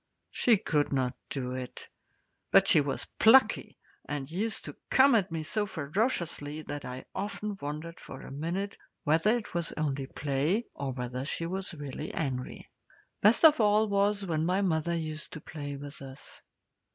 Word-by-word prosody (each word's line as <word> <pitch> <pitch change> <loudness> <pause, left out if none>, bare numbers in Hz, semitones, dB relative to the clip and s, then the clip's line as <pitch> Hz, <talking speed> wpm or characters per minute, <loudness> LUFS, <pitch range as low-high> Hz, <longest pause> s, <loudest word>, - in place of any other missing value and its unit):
She 235 -3 +4
could 150 -5 0
not 130 -2 +1 0.2
do 125 -3 -3
it; 130 -1 -6 0.6
but 195 0 +6
she 155 - +6
was 140 -1 -2
plucky, 255 +4 +5 0.3
and 145 -1 -4
used 215 +6 -2
to - - -7
come 270 0 +6
at 195 -5 +2
me 160 -1 -2
so 205 +6 -1
ferociously 155 - -1
that 145 -1 -6
I 125 +1 -6
often 205 +1 -3
wondered 155 +3 -5
for 135 - -9
a - - -10
minute 170 +8 -3 0.3
whether 165 +10 +3
it 220 - -7
was 170 -1 0
only 140 -3 -2
play 145 - 0
or 140 -1 -3
whether 125 0 -4
she 160 +3 -3
was 190 0 -4
really 145 +1 -6
angry. 130 -5 -3 0.5
Best 220 +9 +6
of 310 -3 +8
all 210 +1 +4
was 200 0 +2
when 160 -3 0
mother 170 -2 +1
used 155 -2 -4
to 155 - -6
play 145 -2 -6
with 145 +1 -8
us. 135 +1 -9
160 Hz, 165 wpm, -30 LUFS, 145-200 Hz, 0.6 s, of